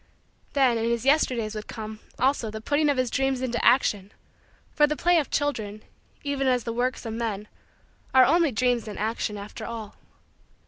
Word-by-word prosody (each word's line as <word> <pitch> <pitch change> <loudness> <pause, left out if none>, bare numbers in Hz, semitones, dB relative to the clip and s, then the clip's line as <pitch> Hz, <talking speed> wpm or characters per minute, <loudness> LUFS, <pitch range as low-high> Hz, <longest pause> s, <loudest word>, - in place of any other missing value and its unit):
Then 260 -5 +3
in 225 - -1
his 235 +1 -1
Yesterdays 250 -7 +2
would 215 -1 -6
come, 215 -1 -7 0.2
also, 255 -3 +1
the 220 +1 -6
putting 290 +6 +1
of 285 - +1
his 255 -2 0
dreams 270 -1 +1
into 245 -2 -2
action, 205 -6 +3 0.6
for 295 -1 +4
the 300 - -1
play 345 +2 +3
of 295 - -3
children, 215 -8 -2 0.4
even 280 -2 -1
as 250 -2 +2
the 230 - -3
works 250 +2 -1
of 225 - -4
men, 220 -3 -3 0.6
are 260 -1 +7
only 330 0 +3
dreams 245 -1 +1
in 210 - -6
action 215 0 -2
after 200 +1 -8
all. 225 -3 -6
240 Hz, 180 wpm, -26 LUFS, 220-275 Hz, 0.6 s, are